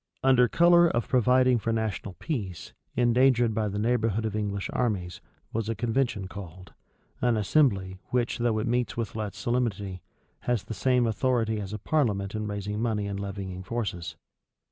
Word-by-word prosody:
Under 130 -2 +5
color 170 +5 +6
of 120 -8 -1
providing 125 0 +4
for 115 - -1
national 110 -4 -2
peace, 100 - -5 0.2
endangered 120 -1 +4
by 110 0 0
the 100 0 -3
neighborhood 115 -1 +1
of 110 -1 -2
English 100 -2 -2
armies, 95 -8 -1 0.3
was 110 0 -2
a 115 - -1
convention 115 -3 -1
called; 95 -2 -10 0.5
an 120 -2 +2
assembly 100 -5 +2
which 120 0 0
though 120 -2 +1
it 110 - -1
meets 120 0 0
with 115 -2 -3
less 105 -3 -4
solemnity, 100 -6 -1 0.4
has 120 -5 -1
the - - -6
same 125 +1 +2
authority 115 -1 +1
as 100 -1 -6
a 105 - -3
parliament 105 -6 0
in 110 -1 -3
raising 105 +1 -3
money 110 -3 0
and 100 -1 -4
levying 100 -2 -5
forces. 95 -4 -4
110 Hz, 165 wpm, -27 LUFS, 100-120 Hz, 0.5 s, color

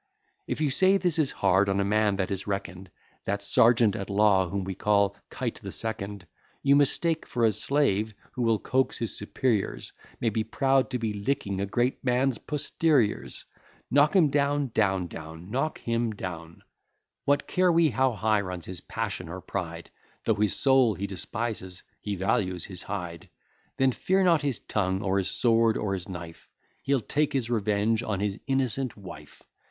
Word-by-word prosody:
If - - -3
you 150 -3 +2
say 190 +7 +4
this 175 -4 0
is 145 -3 +2
hard 95 +2 +4
on 100 0 +1
a - - +2
man 105 0 +2
that 95 0 -2
is 100 +1 -4
reckon'd 95 -2 -4 0.4
That 100 +1 -2
sergeant 115 -1 +4
at 100 - -5
law 100 -2 +3
whom 100 +1 -2
we 95 +1 -4
call 100 +1 +2
Kite - - -4
the - - -6
Second, 100 -4 -4 0.4
You 140 0 +5
mistake; 160 +3 +2
for 120 -1 +1
a 110 - +4
slave, 110 -2 0 0.2
who 125 - -5
will 115 -2 +3
coax 130 +4 0
his 115 - -2
superiors, 105 0 -1 0.3
May 115 - +1
be 110 +1 0
proud 135 +4 +1
to 125 - -1
be 110 -3 -2
licking 100 -2 -2
a 100 - -1
great 120 +5 0
man's 125 -1 +1
posteriors. 150 -5 0 0.5
Knock 145 +4 +4
him 170 -6 +5
down, 140 -1 +1
etc. 95 - -2 0.7
What 145 0 +2
care 185 -1 +3
we 165 -3 +4
how 130 +3 +2
high 110 -1 +1
runs 90 -3 -6
his 90 -3 -7
passion 90 -2 -4
or 95 +2 -6
pride? 85 -3 -5 0.3
Though 110 - +3
his 105 -1 +1
soul 130 -5 +4
he 100 - -4
despises, 100 -1 -4 0.2
he 105 -1 -3
values 95 -2 0
his 95 -3 -8
hide; 90 -5 -6 0.5
Then 135 0 +3
fear 190 +9 +1
not 170 -4 +4
his 140 -6 -2
tongue, 95 -1 -1
or 100 -1 +1
his 95 - -1
sword, 115 -2 +3
or 100 -2 -1
his 90 -2 -5
knife; 85 -3 -9 0.3
He'll 135 -2 +1
take 150 +7 0
his 125 -4 -1
revenge 110 0 +1
on 105 -4 -2
his 100 0 -2
innocent 135 -2 -1
wife. 95 -4 -12
110 Hz, 170 wpm, -27 LUFS, 95-130 Hz, 0.7 s, You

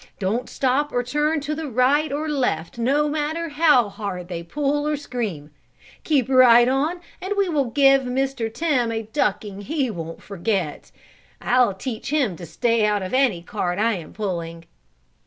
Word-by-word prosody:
Don't 220 +6 -2
stop 275 +3 0
or 245 - 0
turn 295 +5 0
to 295 +2 -3 0.2
right 270 +5 +2
or 300 +2 -2
left 245 - -1
no 280 +6 +2
matter 310 +3 -2
how 295 -6 +4
hard 195 -4 -6
they 170 -2 -4
pull 290 - -1
or 300 -1 0
scream. 215 - -5 0.5
Keep 280 -7 +2
right 245 -2 +6
on 295 +7 0 0.2
and 380 +3 -2
we 400 -1 +2
will 300 -5 +1
give 275 +2 +4
Mr. 255 -2 -2
Tim 255 -5 0
a 225 0 -2
ducking 210 -3 -2
he 270 +2 -1
won't 165 -3 -7
forget. 190 -5 -3 0.5
I'll 245 -5 +2
teach 235 +5 -5
him 275 - +1
to 170 - -9
stay 230 +7 +1
out 210 -2 +1
of 185 - -6
any 250 -10 +2
cart 175 +1 -3
I 225 +2 +2
am 175 -5 -7
pulling!" 170 -5 -5
250 Hz, 165 wpm, -22 LUFS, 200-290 Hz, 0.5 s, right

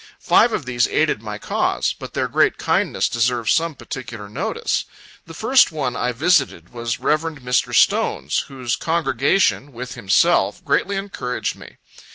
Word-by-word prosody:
Five 240 - +4
of 155 - -3
these 120 -2 +1
aided 150 -8 +1
my 105 -2 -6
cause; - - -1
but - - -10
their - - 0
great - - +2
kindness - - 0
deserves 120 -1 +1
some 165 -1 0
particular 115 -6 -8
notice. 105 - -2 0.4
The 165 - -10
first 255 +4 +4
one 140 -6 -2
I 125 - -1
visited 140 - +1
was 115 -1 -3
Rev. 155 0 +1 0.2
Mr. 125 -1 0
Stone's, 65 +3 +2
whose 130 -4 -3
congregation, 155 -1 +1
with 125 +1 -7
himself, 95 0 +2
greatly 200 - +1
encouraged 195 -11 -3
me. - - -14
125 Hz, 150 wpm, -21 LUFS, 115-155 Hz, 0.4 s, Five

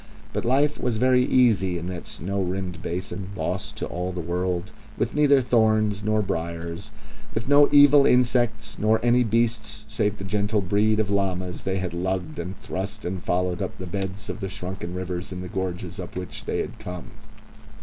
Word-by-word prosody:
But - - -2
life 140 +4 +2
was 120 -3 0
very 125 +2 +4
easy 110 -9 +3
in 85 - -5
that 90 -2 -6
snow 100 +5 -3
rimmed 90 -2 -3
basin, 95 +2 -4
lost - - -2
to - - -3
all 90 +1 -3
the 90 - -5
world, 90 +3 -2 0.3
with 115 - 0
neither 145 -2 +5
thorns 110 -4 +2
nor 110 0 +1
briars, 85 -1 -4 0.5
with 115 +2 -2
no 145 +1 +6
evil 145 -1 +7
insects 125 -1 +2
nor 110 +1 +3
any 120 +1 +5
beasts 110 -1 0
save 105 -2 0
the - - -7
gentle 105 +2 0
breed 105 +3 +2
of 105 -2 +1
llamas 95 -2 -1
they 95 0 -1
had 95 -2 -3
lugged 90 +1 -2
and 90 +2 -5
thrust 100 +3 -5
and 90 +1 -3
followed 90 0 0
up - - -4
the 95 - -6
beds 95 +2 -4
of - - -5
the 95 -3 -3
shrunken 90 -2 -5
rivers 90 0 -4
in 90 0 -5
the 90 - -5
gorges 90 -1 -4
up 90 - -7
which 90 -1 -5
they - - -1
had 115 - -6
come. 90 -5 -7
95 Hz, 185 wpm, -25 LUFS, 90-110 Hz, 0.5 s, evil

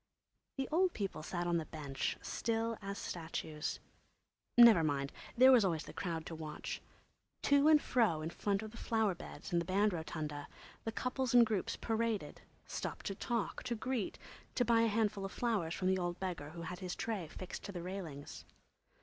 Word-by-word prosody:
The 270 - -1
old 360 +3 +3
people 195 -6 -3
sat 175 +2 -3
on 175 -1 +2
the 160 - -3
bench, 140 -4 -3
still 230 0 -1
as 200 0 -4
statues. 160 -2 -4 0.8
Never 230 -8 +9
mind, 140 -2 0 0.3
there 260 +2 +9
was 245 -4 +7
always 165 -5 +1
the - - -10
crowd 165 -4 -3
to - - -6
watch. 155 -1 -5 0.6
To 285 +1 +5
and 310 -1 +8
fro, 215 - +2
in 160 - -3
front 200 +3 0
of 215 - -7
the 230 - -11
flower 220 -4 +1
beds 175 - -9
and 170 -1 +3
the - - -4
band 200 +3 +3
rotunda, 150 -3 -4 0.4
the 225 - -1
couples 250 +3 -1
and 240 -1 +9
groups 215 -4 -1
paraded, 225 -2 -1 0.2
stopped - - -5
to 195 - -1
talk, 230 +2 -2
to 240 -2 -2
greet, 240 -2 -2 0.4
to 245 - +3
buy 230 0 +5
a 230 - +4
handful 215 -2 +1
of 195 - -4
flowers 205 -9 0
from 185 - -1
the 190 0 +3
old 175 0 -2
beggar 175 -6 -3
who 170 +1 -7
had 180 +1 -5
his 180 -1 -4
tray 210 -7 -2
fixed 185 +4 -7
to - - -5
the 175 -3 -5
railings. 170 -7 -6
195 Hz, 190 wpm, -35 LUFS, 165-230 Hz, 0.8 s, Never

